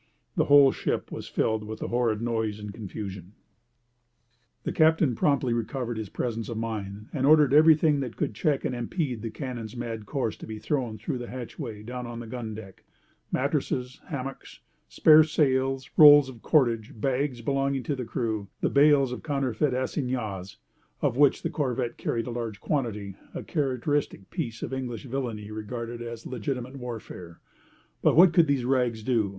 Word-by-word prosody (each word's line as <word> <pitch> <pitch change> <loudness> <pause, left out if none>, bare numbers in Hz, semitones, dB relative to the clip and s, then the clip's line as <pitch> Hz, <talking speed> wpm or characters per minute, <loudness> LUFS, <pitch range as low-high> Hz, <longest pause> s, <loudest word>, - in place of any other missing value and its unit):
The - - +2
whole 140 -1 +7
ship - - -2
was - - -6
filled 110 -1 0
with 110 +1 -6
the - - -5
horrid 115 -2 0
noise 110 -3 -1
and 105 -1 -7
confusion. 100 -3 -7 1.3
The - - -2
captain 160 -4 +4
promptly 135 -1 +1
recovered 120 0 -3
his 105 -3 -5
presence 115 +1 -3
of 115 - -4
mind 105 -2 -5
and 135 - -1
ordered 150 -2 +6
everything 155 -1 +6
that 125 -4 -4
could - - -1
check 140 +6 0
and - - -1
impede 125 - -2
the 115 - -4
cannon's 120 -3 -6
mad 115 -3 -5
course 130 -7 -2
to - - -10
be 110 -1 -6
thrown 115 0 -2
through 125 +5 -4
the 120 - -7
hatchway 120 -3 -7
down 125 +1 -6
on 120 0 -7
the 120 - -7
gun 115 -2 -6
deck—mattresses, 125 +5 -4
hammocks, 135 -5 -6 0.3
spare 155 - +7
sails, 135 -4 +1
rolls 145 -3 +9
of 120 -4 -12
cordage, 115 -7 +1
bags 130 +1 -1
belonging 135 0 0
to 145 - -2
the 130 - -4
crew, 110 -3 -3 0.2
and - - +1
bales 140 -2 +5
of 125 - -5
counterfeit 140 -2 0
assignats, 125 -8 -3 0.5
of - - +2
which 145 +1 +4
the - - 0
corvette 125 -4 -2
carried 115 -1 -1
a 125 - -5
large 115 -4 -4
quantity—a 105 -9 -4
characteristic 140 - -1
piece 125 -11 -4
of - - -4
English 130 -1 -4
villany 115 -5 -4
regarded 115 +2 -5
as 115 -1 -7
legitimate 125 +2 -4
warfare. 110 -8 -8 0.6
But - - +4
what 175 +1 +7
could 170 -2 +5
these 140 -4 +1
rags 125 -4 +1
do? 115 -4 +1
125 Hz, 165 wpm, -27 LUFS, 110-135 Hz, 1.3 s, rolls